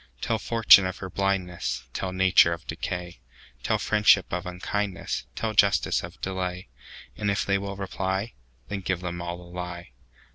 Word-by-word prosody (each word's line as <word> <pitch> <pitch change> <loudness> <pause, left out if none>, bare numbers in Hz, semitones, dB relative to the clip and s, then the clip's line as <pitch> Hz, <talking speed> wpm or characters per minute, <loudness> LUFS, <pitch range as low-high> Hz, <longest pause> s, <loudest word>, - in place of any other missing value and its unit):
Tell 115 - -1
fortune 110 -4 +6
of 95 - -5
her 95 -1 -7
blindness; 90 -8 -1
Tell 95 - -3
nature 95 -2 +5
of 85 - -8
decay; 90 -3 -5 0.4
Tell - - +1
friendship 105 -4 +3
of 90 +1 -2
unkindness; 95 +2 -3
Tell 110 -1 -2
justice 100 -1 +3
of - - -10
delay; 90 -1 -3 0.5
And 105 - -1
if 100 -1 0
they 100 0 +2
will 100 0 -5
reply, 95 +2 -3 0.3
Then 100 - -3
give 95 -1 -2
them 85 -1 -4
all 85 0 -4
the 90 - -12
lie. 90 -2 -7
95 Hz, 160 wpm, -26 LUFS, 90-100 Hz, 0.5 s, fortune